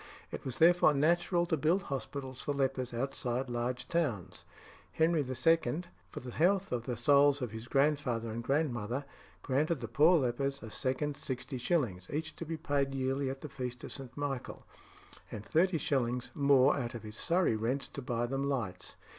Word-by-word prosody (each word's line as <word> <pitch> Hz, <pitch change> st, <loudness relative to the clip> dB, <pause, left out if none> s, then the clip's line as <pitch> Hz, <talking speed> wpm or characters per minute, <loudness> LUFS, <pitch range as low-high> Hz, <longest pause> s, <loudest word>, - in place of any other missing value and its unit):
It -, -, -6 dB
was 130 Hz, -, -4 dB
therefore 170 Hz, -2 st, +6 dB
natural 175 Hz, +4 st, +2 dB
to 170 Hz, -, +1 dB
build 165 Hz, +6 st, +2 dB
hospitals 130 Hz, 0 st, -5 dB
for 145 Hz, -, -2 dB
lepers 135 Hz, -2 st, 0 dB
outside 125 Hz, 0 st, -2 dB
large 125 Hz, +1 st, -2 dB
towns. 105 Hz, -, -2 dB, 0.5 s
King 160 Hz, +1 st, +4 dB
Henry 165 Hz, -, +2 dB
II., 145 Hz, +3 st, +1 dB, 0.3 s
for -, -, -7 dB
the 125 Hz, 0 st, -7 dB
health 190 Hz, +7 st, +2 dB
of 120 Hz, -1 st, -2 dB
the 120 Hz, -2 st, -2 dB
souls 140 Hz, +3 st, +5 dB
of 125 Hz, -5 st, -3 dB
his 110 Hz, +1 st, -7 dB
grandfather 135 Hz, -5 st, +1 dB
and 115 Hz, +2 st, -4 dB
grandmother, 135 Hz, -2 st, -1 dB, 0.4 s
granted 150 Hz, +5 st, +1 dB
the 135 Hz, -, -6 dB
poor 165 Hz, +4 st, +5 dB
lepers 135 Hz, +1 st, -1 dB
a 110 Hz, -, -8 dB
second 140 Hz, +4 st, -1 dB
60s. 125 Hz, -, -2 dB
each 155 Hz, +1 st, -3 dB
to 170 Hz, -, -6 dB
be 165 Hz, +1 st, -4 dB
paid 140 Hz, -3 st, 0 dB
yearly 135 Hz, +1 st, 0 dB
at 135 Hz, 0 st, -6 dB
the 150 Hz, -, -5 dB
feast 125 Hz, -2 st, -5 dB
of -, -, -7 dB
St. 135 Hz, -1 st, -9 dB
Michael, 140 Hz, -3 st, -4 dB, 0.7 s
and 105 Hz, -, -6 dB
30s. 140 Hz, -8 st, +1 dB
more 140 Hz, -3 st, +5 dB
out 120 Hz, -1 st, -4 dB
of 115 Hz, -, -7 dB
his 105 Hz, 0 st, -8 dB
Surrey 170 Hz, -2 st, +2 dB
rents 120 Hz, +6 st, -1 dB
to 140 Hz, -, -7 dB
buy 120 Hz, -2 st, -1 dB
them 135 Hz, +3 st, -1 dB
lights. 100 Hz, -10 st, -3 dB
135 Hz, 175 wpm, -32 LUFS, 120-150 Hz, 0.7 s, therefore